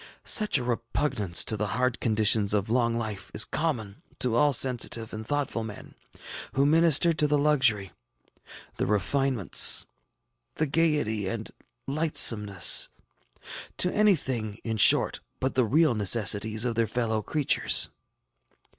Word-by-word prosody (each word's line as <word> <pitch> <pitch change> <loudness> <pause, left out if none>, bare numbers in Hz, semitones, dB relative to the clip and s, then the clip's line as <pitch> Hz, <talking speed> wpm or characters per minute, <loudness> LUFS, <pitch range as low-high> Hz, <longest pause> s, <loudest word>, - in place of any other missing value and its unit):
ŌĆ£Such 215 -8 +3
a 125 - -4
repugnance 115 -4 -1
to 110 - 0
the 105 0 -3
hard 125 -1 -1
conditions 110 -2 +2
of 105 +1 -3
long 120 -1 0
life 110 -4 -6
is - - +3
common 120 -11 -4 0.2
to 125 -3 -1
all 145 +4 +2
sensitive 120 -3 +1
and 110 0 -8
thoughtful 145 -5 -3
men, 105 -2 -11 0.6
who 135 +1 +1
minister 165 +2 +3
to 150 -1 0
the 150 0 0
luxury, 130 -10 +1 0.9
the - - -2
refinements, 115 +2 +2 0.7
the 155 - -1
gayety 145 - -1
and 110 +3 -6 0.4
lightsomeness, 115 - +2 0.9
to 180 - +3
anything, 130 - -1
in 110 -1 -4
short, 100 - +4 0.2
but 130 0 -2
the 130 -2 +1
real 150 +4 +2
necessities 105 +1 +2
of 120 - -1
their 115 0 -1
fellow 110 -1 -2
creatures. 145 +5 +1
115 Hz, 130 wpm, -25 LUFS, 110-145 Hz, 0.9 s, short